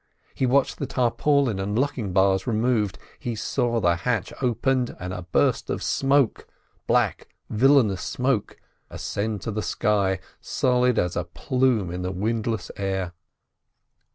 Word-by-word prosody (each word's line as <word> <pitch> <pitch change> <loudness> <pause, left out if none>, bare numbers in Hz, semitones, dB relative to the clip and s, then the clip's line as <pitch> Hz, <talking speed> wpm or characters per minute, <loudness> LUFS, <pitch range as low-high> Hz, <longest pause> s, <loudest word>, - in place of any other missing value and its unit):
He 130 - 0
watched 135 +2 +2
the 140 - -2
tarpaulin 125 -1 +1
and 100 +2 -2
locking 130 -7 -1
bars 95 +2 +2
removed. 110 -3 +1 0.2
He 120 -2 -3
saw 115 +2 0
the 85 -4 +2
hatch 125 +8 -1
opened, 125 +1 0
and 90 +1 -5
a 90 - -5
burst - - +2
of - - -2
smoke—black, 135 -3 0 0.2
villainous 115 -5 +4
smoke—ascend 110 -3 -3
to 115 - -3
the 110 +1 -2
sky, 100 -4 +1 0.2
solid 125 -1 +1
as 90 -1 0
a 85 - -1
plume 120 0 0
in 90 +1 -4
the 90 - -2
windless 110 +3 -2
air. 95 -2 -2
110 Hz, 130 wpm, -24 LUFS, 95-125 Hz, 0.2 s, villainous